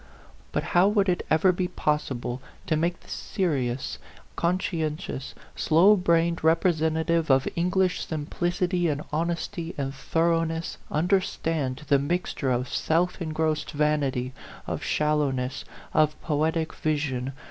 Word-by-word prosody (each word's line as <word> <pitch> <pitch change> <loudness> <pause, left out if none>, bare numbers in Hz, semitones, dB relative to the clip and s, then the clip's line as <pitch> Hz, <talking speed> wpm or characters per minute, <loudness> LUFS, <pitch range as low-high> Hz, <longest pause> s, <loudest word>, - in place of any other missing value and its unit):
But - - -1
how 180 +2 +6
would 205 -1 +2
it 175 - 0
ever 160 +4 +5
be 180 0 -1
possible 135 -7 -2 0.2
to 155 - +1
make 170 +3 0
this - - -14
seri 150 -10 -1
ous, 125 +2 -4 0.4
conscientious, 160 -5 -2 0.2
slow 180 +7 +5
brained 170 -2 +2
representa 160 -1 +2
tive 165 -1 +1
of 135 -1 +4
English 180 +1 +1
simplicity 175 +3 -1
and 150 -1 -1
honesty 170 +2 -2
and 135 -1 -2
thoroughness 165 +2 0
understand 160 -5 0
the 140 -1 +4
mixture 150 -2 -1
of 125 0 0
self 175 +7 0
engrossed 155 -1 -1
vanity, 145 -4 0 0.3
of - - -3
shallowness, 145 -4 0 0.3
of 155 0 +3
poetic 160 +1 0
vision 140 -4 -1
160 Hz, 125 wpm, -26 LUFS, 145-170 Hz, 0.4 s, how